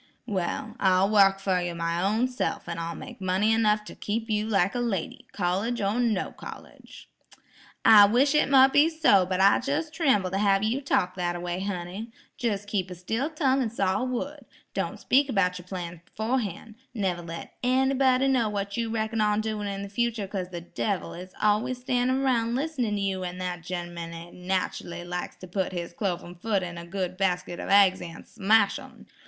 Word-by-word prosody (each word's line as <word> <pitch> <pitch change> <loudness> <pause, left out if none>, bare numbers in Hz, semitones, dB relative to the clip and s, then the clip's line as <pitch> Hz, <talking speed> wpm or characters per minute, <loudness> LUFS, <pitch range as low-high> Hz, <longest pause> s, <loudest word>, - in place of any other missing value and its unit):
"Well, 210 +1 -3
I'll 190 +1 +3
wark 195 -2 +5
fer 190 -2 0
you 175 -1 -3
my 170 +1 -1
own 215 +6 +2
self, 255 -7 -3
and 170 -1 -4
I'll 165 0 -4
make 250 -5 -10
money 190 +4 +2
enough 215 -1 +2
to - - -10
keep 225 +2 -3
you 210 0 0
like 195 -3 +2
a 245 - -2
lady, 210 -8 -3
college 200 +7 -1
or 205 +3 0
no 225 -6 0
college." - - -12 0.8
"I 215 -2 +9
wish 260 +7 +3
it 300 - +3
mote 265 -1 +6
be 295 +3 +6
so; 295 - +4
but 185 0 -1
I 195 +1 +6
jes' 300 +4 -1
trimbles 265 - +2
to 195 - -1
have 200 -1 +3
you 235 +6 0
talk 180 -9 +1
that 175 -1 -1
a - - -4
way, 175 +1 -3
honey; 190 +3 -4 0.3
jes' 205 -4 -1
keep 195 -3 -2
a 180 - -7
still 225 - -2
tongue 275 -4 +1
and 230 -4 -1
saw 195 +1 0
wood. 260 +4 -3 0.3
Don't - - -3
speak 275 +2 +3
about 180 -5 +1
your 180 - -13
plans 175 -2 -6
beforehan'. 220 -1 -3 0.2
Never 185 -5 -1
let 165 0 -8
anybody 265 +1 +3
know 250 -5 +2
what 200 -1 -3
you 230 -1 -1
reckon 220 0 -1
on 210 0 +2
doin' 215 -1 -2
in 200 0 -4
the - - -5
future 225 0 -1
'cause 190 -2 -4
the 175 -2 -6
devil 190 +3 -3
is 180 +1 -10
always 215 +5 +1
standin' 255 +1 0
'roun' 235 -3 +1
listenin' 260 -7 -1
to 200 - -2
you, 190 -1 -1
an' 180 0 -5
that 180 -1 -4
gen'man 175 -1 -5
jes' 170 +1 -9
nachally 180 -1 -3
likes 180 0 -4
to 185 - -11
put 185 +1 -2
his 170 -1 -5
cloven 175 -3 -3
foot 195 +2 -1
into 175 -1 -6
a - - -10
good 185 0 -3
basket 180 -2 -1
of - - -5
aigs 195 -2 +5
an' 165 -1 -9
smash 220 +1 +2
'em. - - -14
200 Hz, 200 wpm, -27 LUFS, 180-235 Hz, 0.8 s, I